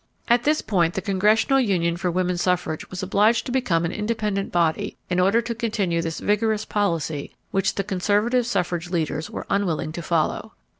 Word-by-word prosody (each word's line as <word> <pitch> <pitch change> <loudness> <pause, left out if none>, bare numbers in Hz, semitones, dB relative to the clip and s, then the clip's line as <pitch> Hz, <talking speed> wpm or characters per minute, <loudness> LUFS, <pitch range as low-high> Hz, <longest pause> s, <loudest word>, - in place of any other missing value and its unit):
At 240 0 +3
this 300 +1 +2
point 175 -5 +1
the 190 - -1
Congressional 210 +7 +3
Union 175 -8 +1
for 180 +1 -1
Woman 180 +1 0
Suffrage 175 -3 -1
was 185 +1 -5
obliged 210 +5 +3
to - - -4
become 190 -11 +1
an 165 - -2
independent 210 -2 -2
body 170 -2 0
in 180 - +2
order 200 +6 +3
to 235 - -3
continue 210 -7 -1
this 165 -1 -4
vigorous 215 +1 +1
policy 165 -8 -2 0.2
which 195 0 0
the 195 - -1
conservative 210 +6 +1
suffrage 175 -5 -1
leaders 160 -3 -2
were - - -6
unwilling 180 -6 0
to 170 - -5
follow. 165 -2 -1
190 Hz, 180 wpm, -23 LUFS, 170-215 Hz, 0.2 s, At